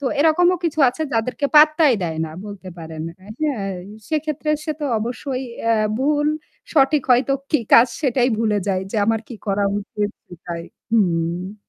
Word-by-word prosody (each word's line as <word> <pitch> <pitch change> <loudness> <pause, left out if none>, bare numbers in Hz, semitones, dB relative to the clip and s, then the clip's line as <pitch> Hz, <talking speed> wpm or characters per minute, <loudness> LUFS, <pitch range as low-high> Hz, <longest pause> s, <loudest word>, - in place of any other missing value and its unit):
তো - - -6
এরকমও 350 +4 +4
কিছু 315 -1 -1
আছে 285 +6 -3
যাদেরকে 235 +5 0
পাত্তাই 305 -3 +6
দেয় 160 -2 -3
না। 155 - -7 0.2
বলতে 200 -2 -9
পারেন। 160 -1 -7 1.1
সেক্ষেত্রে 305 -1 -1
সে 310 - -1
তো - - -2
অবশ্যই 255 +3 -3 0.2
অ্যাঁ 225 -2 +2
ভুল, 295 +2 +1 0.5
সঠিক 290 -1 +4
হয়তো 250 +2 +4 0.2
কি 300 - +3
কাজ 230 - +9
সেটাই 255 -3 +2
ভুলে 215 -2 +1
যাই 185 -1 +1
যে 225 - -3
আমার 225 -1 +2
কি 240 - -7
করা 200 0 +1
উচিত 205 0 -3 0.2
সেটাই। 170 -1 -7 0.3
হুম। 180 -1 0
235 Hz, 155 wpm, -21 LUFS, 200-295 Hz, 1.1 s, কাজ